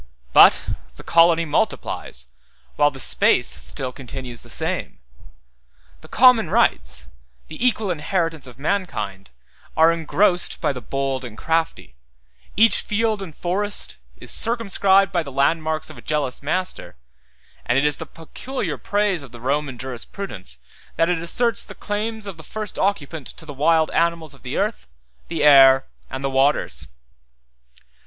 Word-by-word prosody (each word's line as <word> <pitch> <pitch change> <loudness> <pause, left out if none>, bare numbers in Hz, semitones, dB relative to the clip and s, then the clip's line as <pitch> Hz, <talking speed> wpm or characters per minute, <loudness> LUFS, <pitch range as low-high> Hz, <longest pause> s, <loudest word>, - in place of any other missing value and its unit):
But - - +7 0.3
the - - -12
colony 170 0 +4
multiplies, 60 - -2 0.5
while 145 - +4
the 135 -2 -10
space 65 - +3
still 130 -1 -4
continues 125 -2 -8
the - - -13
same; - - -3 1.0
the - - -13
common 250 -2 +5
rights, 65 -1 0 0.4
the - - -5
equal 220 -5 +1
inheritance 165 -2 -2
of 125 - -13
mankind, 120 - -3 0.5
are 160 +1 +6
engrossed 175 +3 +1
by - - 0
the 125 - -7
bold 135 +1 -2
and 115 -3 -9
crafty; 165 - -2 0.6
each 225 +2 +6
field 215 -1 0
and 170 -6 -8
forest 205 - -2 0.2
is - - -5
circumscribed 195 -4 +2
by 175 -3 +1
the 140 -4 -8
landmarks 155 +3 0
of - - -13
a - - -12
jealous 145 -4 -2
master; 180 - -3 0.7
and 120 - +1
it 140 - +3
is 150 -1 +1
the - - -7
peculiar 255 - -5
praise 205 -4 0
of 135 -4 -11
the 120 - -11
Roman 135 +1 -2
jurisprudence, 120 - -6 0.4
that 165 +2 +2
it 175 - 0
asserts 230 +6 +1
the - - -10
claim 215 +2 -3
of 195 -4 -7
the - - -10
first 215 +4 -5
occupant 160 -7 -1
to 160 - -11
the 145 - -8
wild 160 +3 +2
animals 165 -2 0
of 140 - -17
the 130 0 -5
earth, 210 +3 -2 0.4
the 165 -2 -2
air, 135 -2 +7 0.2
and 130 +1 -6
the 135 - 0
waters. 135 +2 +1
160 Hz, 150 wpm, -22 LUFS, 135-195 Hz, 1.0 s, But